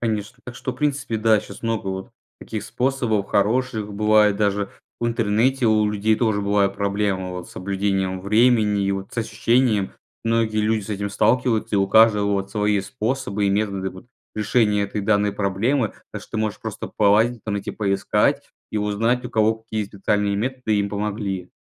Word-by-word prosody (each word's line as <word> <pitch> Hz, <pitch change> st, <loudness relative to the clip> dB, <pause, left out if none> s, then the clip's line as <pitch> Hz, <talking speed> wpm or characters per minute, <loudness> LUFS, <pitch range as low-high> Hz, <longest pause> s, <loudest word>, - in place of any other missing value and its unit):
Конечно. 110 Hz, +1 st, -3 dB
Так 125 Hz, -, -8 dB
что, 130 Hz, +1 st, -4 dB
в -, -, -15 dB
принципе, 145 Hz, -6 st, -1 dB
да, 110 Hz, -1 st, +3 dB
щас -, -, -12 dB
много 115 Hz, -3 st, -2 dB
вот 95 Hz, 0 st, -5 dB, 0.3 s
таких 110 Hz, -2 st, -5 dB
способов 125 Hz, -6 st, 0 dB
хороших. 110 Hz, 0 st, 0 dB
Бывает 105 Hz, 0 st, +4 dB
даже 100 Hz, -1 st, 0 dB, 0.3 s
в 120 Hz, -, 0 dB
интернете 115 Hz, +3 st, +1 dB
у 110 Hz, -1 st, +3 dB
людей 105 Hz, +1 st, +1 dB
тоже 110 Hz, -3 st, +1 dB
бывают 100 Hz, -1 st, +1 dB
проблемы 100 Hz, -2 st, -1 dB
вот 90 Hz, -1 st, -7 dB
с -, -, -14 dB
соблюдением 95 Hz, -1 st, -1 dB
времени 105 Hz, 0 st, +3 dB
и 100 Hz, -, +1 dB
вот 95 Hz, 0 st, -5 dB
с -, -, -4 dB
ощущением. 115 Hz, -2 st, +1 dB, 0.3 s
Многие 115 Hz, -1 st, +1 dB
люди 110 Hz, 0 st, +1 dB
с 100 Hz, -, -8 dB
этим 100 Hz, 0 st, -3 dB
сталкиваются 115 Hz, -1 st, +1 dB
и -, -, +3 dB
у 95 Hz, -, +2 dB
каждого 105 Hz, -2 st, +5 dB
вот 100 Hz, -1 st, -2 dB
свои 105 Hz, -1 st, +1 dB
способы 110 Hz, -1 st, -2 dB
и -, -, +2 dB
методы 100 Hz, -2 st, -1 dB
вот 95 Hz, +4 st, -13 dB, 0.3 s
решения 105 Hz, -1 st, +2 dB
этой 100 Hz, +1 st, -3 dB
данной 105 Hz, 0 st, +2 dB
проблемы. 105 Hz, +5 st, 0 dB, 0.2 s
Так -, -, -6 dB
что -, -, -17 dB
ты -, -, -2 dB
можешь 110 Hz, -1 st, -2 dB
просто -, -, -6 dB
полазить, 110 Hz, +3 st, +3 dB
там 105 Hz, -2 st, -2 dB
эти 100 Hz, -, -4 dB
поискать 100 Hz, -2 st, 0 dB, 0.2 s
и -, -, -3 dB
узнать 115 Hz, +4 st, 0 dB
у 125 Hz, -, -5 dB
кого 110 Hz, -1 st, +3 dB
какие 110 Hz, -1 st, -4 dB
специальные 100 Hz, 0 st, -1 dB
методы 125 Hz, -2 st, -1 dB
им 100 Hz, 0 st, 0 dB
помогли. 100 Hz, -3 st, -3 dB
105 Hz, 180 wpm, -22 LUFS, 100-115 Hz, 0.3 s, каждого